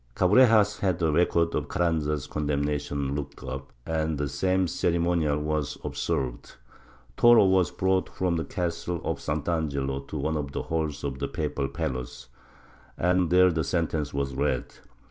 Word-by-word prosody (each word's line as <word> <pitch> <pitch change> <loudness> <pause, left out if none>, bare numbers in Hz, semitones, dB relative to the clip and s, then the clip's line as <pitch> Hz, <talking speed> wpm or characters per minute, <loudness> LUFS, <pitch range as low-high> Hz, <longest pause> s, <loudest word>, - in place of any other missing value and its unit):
Cabrejas 105 +1 +5
had 95 -3 +1
the 80 -3 +1
records 85 +1 +2
of - - -1
Carranza's 75 -4 0
condemnation 70 -1 -2
looked 70 -3 -6
up, 65 +1 -6
and 80 -1 -1
the 75 0 -1
same 95 +6 +1
ceremonial 85 -3 +1
w^as 75 -1 -2
observed, 65 -2 -3 0.6
Toro 120 -3 +7
was 95 -2 +3
brought 95 0 0
from 90 -2 -1
the 80 - -1
castle 85 +2 -3
of - - -2
Sant'Angelo 75 -3 -2
to - - -5
one 80 0 -1
of 70 -2 -4
the - - -3
halls 80 -3 -2
of 70 -2 -3
the - - -1
papal 75 -3 -2
palace, 65 -2 -5 0.7
and 90 -1 +2
there 90 +1 +5
the 80 -1 0
sentence 80 -2 -1
was 70 -1 -2
read. 65 -1 -1
80 Hz, 150 wpm, -27 LUFS, 70-90 Hz, 0.7 s, Toro